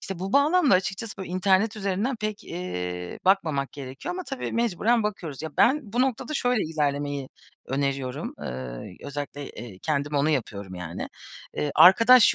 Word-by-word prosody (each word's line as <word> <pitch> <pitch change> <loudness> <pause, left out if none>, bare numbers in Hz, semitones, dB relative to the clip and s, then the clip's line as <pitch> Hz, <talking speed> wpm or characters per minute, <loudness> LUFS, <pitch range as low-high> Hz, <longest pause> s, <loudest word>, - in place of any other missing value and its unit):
İşte, 190 -2 -6
bu 190 +3 -4
bağlamda 290 - +5
açıkçası, 195 +4 -1
böyle, 190 - -5
internet 190 +4 +2
üzerinden 205 +5 -1
pek, 215 -1 -4
eee, 90 0 -4
bakmamak 160 -8 +2
gerekiyor 135 - -6
ama 370 - -4
tabii 270 -2 -4
mecburen 230 0 +2
bakıyoruz. 175 -10 -4
Ya, 160 - -4
ben 275 +5 +5
bu 240 - +1
noktada 260 +2 0
şöyle 245 -5 +2
ilerlemeyi 145 -3 -1 0.4
öneriyorum. 135 +1 -2
Iıı, 65 -3 -6 0.2
özellikle, 145 0 -5
eee, 110 -5 -9
kendim 145 -1 -1
onu 145 +2 +3
yapıyorum 100 -9 -2
yani. 90 -1 -5 0.5
Eee, 150 - 0
arkadaş 230 +6 +8
160 Hz, 150 wpm, -26 LUFS, 135-220 Hz, 0.5 s, arkadaş